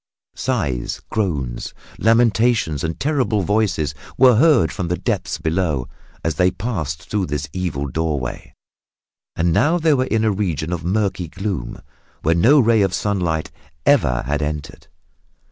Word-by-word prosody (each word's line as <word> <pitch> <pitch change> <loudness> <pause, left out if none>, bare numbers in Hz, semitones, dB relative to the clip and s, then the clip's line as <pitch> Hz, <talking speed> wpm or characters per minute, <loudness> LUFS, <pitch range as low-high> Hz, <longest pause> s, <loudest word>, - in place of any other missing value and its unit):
Sighs, 75 - -2
groans, 70 - -2 0.2
lamentations 115 - +2
and 80 0 -3
terrible 130 -8 +1
voices 100 -7 0 0.2
were 125 -3 +6
heard 155 +4 +4
from 90 -4 -3
the 90 +1 -1
depths - - -2
below 80 -6 -1 0.4
as 80 - 0
they 90 0 +4
passed 85 - -4
through 100 -4 -1
this 75 0 -3
evil 90 -7 -2
doorway, 70 -3 -3 0.8
and 85 0 +1
now 160 - +3
they 160 -2 +3
were 130 -2 +1
in 110 -3 0
a 110 - +3
region 90 -5 -2
of 85 -1 -4
murky 95 -1 -1
gloom, 90 - -5 0.4
where 80 - +3
no 120 - +5
ray 115 -3 +4
of 95 -2 +1
sunlight 90 -7 -1 0.3
ever 65 - +3
had 75 +3 -1
entered. 75 -1 -5
90 Hz, 145 wpm, -20 LUFS, 75-110 Hz, 0.8 s, were